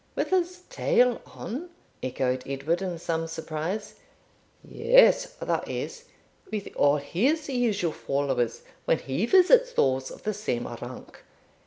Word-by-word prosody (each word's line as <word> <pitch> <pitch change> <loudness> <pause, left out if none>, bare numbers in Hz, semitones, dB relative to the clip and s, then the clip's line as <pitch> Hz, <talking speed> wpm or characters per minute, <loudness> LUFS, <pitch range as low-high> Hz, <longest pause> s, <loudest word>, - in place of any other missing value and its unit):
'With - - -1
his 360 -1 +1
tail 245 -1 +2
on?' 300 +10 -6 0.3
echoed 130 0 -1
Edward 140 +6 -1
in 180 -3 -3
some 165 -1 -2
surprise. 160 +5 -4 0.6
'Yes - - +4
that - - -1
is, 475 +1 -5 0.5
with 210 -2 -3
all 145 +1 +4
his 260 - 0
usual 225 - 0
followers, 135 -5 -1 0.2
when - - +3
he 140 - -2
visits 475 - +6
those 130 0 +1
of - - -12
the 215 - -1
same 190 - -2
rank. - - -9
190 Hz, 130 wpm, -27 LUFS, -, 0.6 s, visits